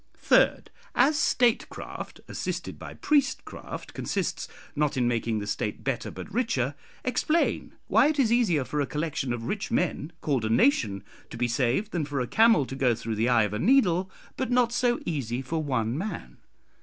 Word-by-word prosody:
"Third, - - +3 0.2
As 280 +5 +4
statecraft 245 -5 0
(assisted - - -4
by - - -9
priestcraft) 290 -2 -1
consists - - -2 0.3
not 150 -2 0
in 125 -2 +2
making 115 -2 0
the 105 - -3
State 100 - -3
better - - -2
but 205 - -9
richer, 145 - 0 0.3
explain 280 +6 0
why - - +4
it 305 -1 0
is 250 -5 +3
easier 205 - +3
for 150 +2 -1
a 140 - -1
collection 150 -4 -2
of 120 -1 -3
rich 200 - -3
men 175 - -1
called 135 -6 0
a 110 - -1
nation 115 - +2 0.3
to - - -8
be 120 +1 +1
saved, 130 - 0
than 165 -4 -1
for 140 -1 -3
a 125 - 0
camel 220 - +4
to 135 - -7
go 125 -3 +2
through 115 +1 -4
the 110 +3 +1
eye 120 -3 +5
of 105 -1 -2
a 105 - -2
needle, 190 - +3 0.3
but 260 - -2
not 245 -1 +2
so 245 -1 +2
easy 130 -5 -2
for 160 +4 -2
one 125 -5 -1
man. 165 - -5
150 Hz, 180 wpm, -27 LUFS, -, 0.3 s, eye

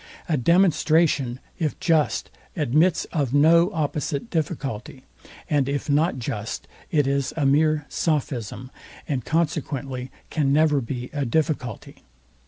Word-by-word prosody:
A 160 - +1
demonstration, 155 -4 +3 0.2
if 155 -4 -1
just, 160 -3 +1 0.2
admits 155 +3 +2
of 140 -4 0
no 170 +5 +5
opposite 150 +3 -2
difficulty; 140 - -3 0.4
and 140 -3 +1
if 145 +1 -2
not 150 +1 +2
just, 115 -3 -4 0.2
it 145 -3 +2
is 140 -1 -1
a 150 - +1
mere 150 +1 +3
sophism, 130 -6 -2 0.4
and 135 -5 -2
consequently 140 -5 -2 0.2
can 145 -4 +1
never 150 -1 +3
be 125 +1 -5
a 145 -1 -1
difficulty. 130 -3 -2
145 Hz, 120 wpm, -24 LUFS, 130-160 Hz, 0.4 s, no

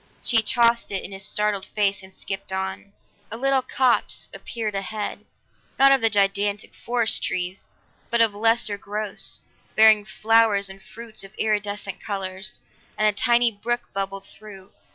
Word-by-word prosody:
She 225 -3 +5
tossed 235 +1 +3
it 195 -2 -3
in - - -7
his 195 0 -5
startled 210 0 -1
face 200 -2 0
and 190 0 -14
skipped 195 0 -6
on. 190 +1 -4 0.4
A 225 - -6
little 270 +1 +2
copse 255 -1 0
appeared 220 -3 -5
ahead, 205 +2 -5 0.5
not 275 0 +7
of 270 -1 +4
the 225 - +4
gigantic 200 0 +1
forest 235 -2 0
trees, 180 +1 -3 0.4
but 235 - +2
of 225 -2 +6
lesser 220 -1 +1
growths, 210 +1 -2 0.3
bearing 215 -1 +6
flowers 210 -1 +2
and 195 0 -13
fruits 220 +2 -7
of 195 +2 -13
iridescent 205 -2 -2
colors, 195 0 -5 0.4
and 215 - +3
a - - +4
tiny 235 +3 +2
brook 240 +3 -4
bubbled 195 0 -3
through. 200 -2 -13
210 Hz, 155 wpm, -23 LUFS, 195-225 Hz, 0.5 s, not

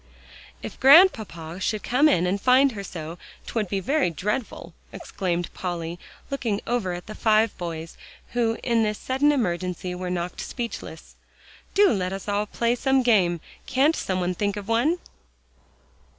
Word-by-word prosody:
"If - - -7
Grandpapa 220 - +5
should 210 +2 -2
come 280 +5 +4
in 175 - +2
and 195 +2 -1
find 260 +3 +5
her 200 -4 -6
so 165 -2 -7 0.3
'twould 215 -5 -2
be 195 - -1
very 275 - +1
dreadful!" 210 - -4 0.2
exclaimed 175 -3 -3
Polly, 170 -2 -4 0.3
looking 230 -7 -1
over 225 -7 -1
at 175 0 -7
the 215 - -8
five 220 0 +2
boys, 165 -2 -6 0.3
who 230 -2 0
in 235 -2 +2
this 210 -1 0
sudden 270 +6 +2
emergency 180 -7 -2
were 180 0 -4
knocked 180 0 -3
speechless. 230 -9 -7 0.6
"Do 405 0 +6
let 185 -3 -1
us 195 +1 -7
all 205 +1 0
play 235 +3 0
some 265 +1 +2
game. 180 -8 +3 0.3
Can't 285 +5 +3
some 185 -1 -2
one 180 0 0
think 205 +2 -2
of 205 -1 -7
one?" 240 +10 +2
205 Hz, 155 wpm, -24 LUFS, 180-245 Hz, 0.6 s, Do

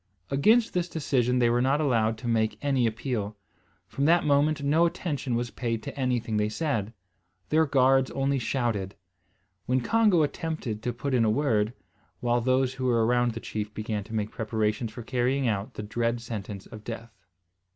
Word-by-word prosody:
Against 220 - +4
this 180 -1 -1
decision 125 -6 +1
they 120 -1 +3
were 120 +1 +2
not 135 +3 +2
allowed 115 -7 +1
to 120 - -7
make 110 -2 +1
any 135 -4 +2
appeal. 110 -2 -3 0.5
From 135 +9 -2
that 170 +3 +4
moment 145 +1 +2
no 160 +4 +4
attention 145 -7 -3
was 120 0 -2
paid 115 -3 -3
to - - -6
anything 125 -5 -1
they 105 0 +1
said. 115 -5 -2 0.6
Their 160 +1 +3
guards 135 -1 +4
only 135 0 0
shouted, 115 -6 -1 0.7
when 130 +1 +2
Congo 210 - +3
attempted 150 -8 -3
to 120 - -1
put 130 +3 -4
in 120 -2 +3
a 110 - +3
word; 110 -3 +1 0.5
while 120 0 +1
those 130 +1 +2
who 130 -1 -4
were 115 -3 +3
around 120 0 +2
the 115 - -5
chief 105 -2 -4
began 110 -1 -3
to 110 +1 -7
make 105 -1 -1
preparations 110 0 -1
for 115 +2 -8
carrying 130 +2 0
out 105 -2 -2
the 105 - -5
dread 115 +2 -1
sentence 105 -4 -6
of 105 -1 -11
death. 115 0 -7
120 Hz, 180 wpm, -27 LUFS, 110-140 Hz, 0.7 s, Against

